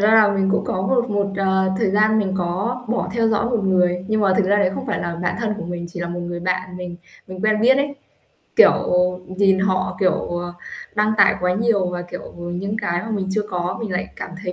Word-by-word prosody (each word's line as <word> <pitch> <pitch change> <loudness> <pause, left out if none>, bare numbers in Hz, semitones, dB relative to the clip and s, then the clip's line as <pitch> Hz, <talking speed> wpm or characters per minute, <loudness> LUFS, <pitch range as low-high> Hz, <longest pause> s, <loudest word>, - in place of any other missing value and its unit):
ra 210 +2 +4
là 215 -2 +6
mình 195 -1 +1
cũng 210 - +1
có 185 - -2
một 240 +3 +1
một, 200 -1 +1
ờ, 190 -1 +2
thời 210 -4 +1
gian 215 +2 +3
mình 190 -2 0
có 195 +8 -2
bỏ 240 - -1
theo 230 -1 +2
dõi 220 +1 +1
một 230 -5 0
người 180 -1 +2
nhưng 215 0 +1
mà 195 -2 +3
thực 205 - +2
ra 200 +2 +3
đấy 195 -3 +3
không - - -5
phải - - -1
là 170 -1 -3
bạn 175 - -1
thân 215 -2 -1
của - - -5
mình, 175 0 -5
chỉ 175 0 -7
là 175 - -3
một 175 0 -4
người 175 0 -5
bạn 185 0 -2
mình 180 -1 -6 0.3
mình 185 0 -8
quen 215 0 +2
biết 260 +3 +5
ấy, 280 0 -1 0.6
kiểu, - - +8 0.5
nhìn 190 0 +2
họ, 185 -1 0
kiểu, 185 -2 +4 0.3
ờ, 175 0 -5 0.4
đăng 215 0 +2
tải 200 - +6
quá 180 0 +1
nhiều 210 -3 +2
và, 175 0 -4
kiểu, 175 - -8
những 175 +4 -4
cái 175 0 -1
mà 220 - -6
mình 195 -3 -2
chưa 210 +2 0
có 180 0 -2
mình 210 -5 -4
lại 180 - -2
cảm - - -6
thấy 180 -2 -3
190 Hz, 250 wpm, -21 LUFS, 180-215 Hz, 0.6 s, kiểu